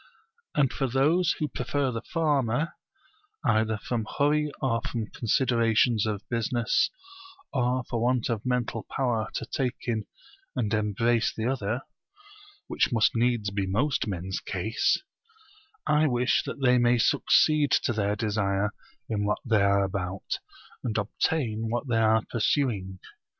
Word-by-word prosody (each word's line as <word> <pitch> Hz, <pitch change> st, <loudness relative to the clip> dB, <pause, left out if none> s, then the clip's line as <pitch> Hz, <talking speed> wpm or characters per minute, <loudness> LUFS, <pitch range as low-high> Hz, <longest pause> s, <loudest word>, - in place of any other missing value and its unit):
And 140 Hz, -4 st, +2 dB
for 135 Hz, -, -1 dB
those 150 Hz, +7 st, +2 dB
who 150 Hz, -, -1 dB
prefer 135 Hz, +1 st, -1 dB
the 115 Hz, -1 st, -4 dB
former, 150 Hz, -2 st, 0 dB, 0.7 s
either 110 Hz, 0 st, +2 dB
from 110 Hz, +1 st, -3 dB
hurry 150 Hz, +1 st, +2 dB
or 115 Hz, -4 st, 0 dB
from 115 Hz, -3 st, -3 dB
considerations 115 Hz, -2 st, +2 dB
of 105 Hz, -1 st, -4 dB
business 115 Hz, 0 st, +1 dB, 0.6 s
or 125 Hz, 0 st, +1 dB
for 115 Hz, -, -2 dB
want 125 Hz, 0 st, +1 dB
of 115 Hz, -3 st, -2 dB
mental 125 Hz, -3 st, -2 dB
power 120 Hz, -4 st, 0 dB
to -, -, -2 dB
take 125 Hz, +1 st, -2 dB
in 110 Hz, -3 st, -1 dB, 0.5 s
and 110 Hz, -2 st, -1 dB
embrace 110 Hz, +2 st, +1 dB
the 110 Hz, -, -4 dB
other 120 Hz, -2 st, -1 dB, 0.8 s
(which -, -, 0 dB
must 115 Hz, -2 st, +3 dB
needs 115 Hz, -3 st, +1 dB
be 100 Hz, -1 st, -1 dB
most 130 Hz, +7 st, 0 dB
men's 95 Hz, -1 st, -3 dB
case), 110 Hz, -, 0 dB, 0.8 s
I 150 Hz, +1 st, +3 dB
wish 125 Hz, -1 st, +2 dB
that -, -, -5 dB
they 125 Hz, -1 st, +5 dB
may 120 Hz, 0 st, +4 dB
succeed 150 Hz, +5 st, +3 dB
to 120 Hz, -, +1 dB
their 105 Hz, -1 st, 0 dB
desire 100 Hz, -2 st, 0 dB, 0.4 s
in 105 Hz, -2 st, -1 dB
what 105 Hz, 0 st, +1 dB
they 110 Hz, -4 st, +3 dB
are 100 Hz, 0 st, +3 dB
about, 95 Hz, -1 st, -3 dB, 0.4 s
and 110 Hz, -3 st, -2 dB
obtain 110 Hz, +1 st, -1 dB
what 120 Hz, +4 st, -2 dB
they 115 Hz, -2 st, +1 dB
are 110 Hz, 0 st, +3 dB
pursuing. 110 Hz, -6 st, 0 dB
115 Hz, 140 wpm, -27 LUFS, 105-130 Hz, 0.8 s, they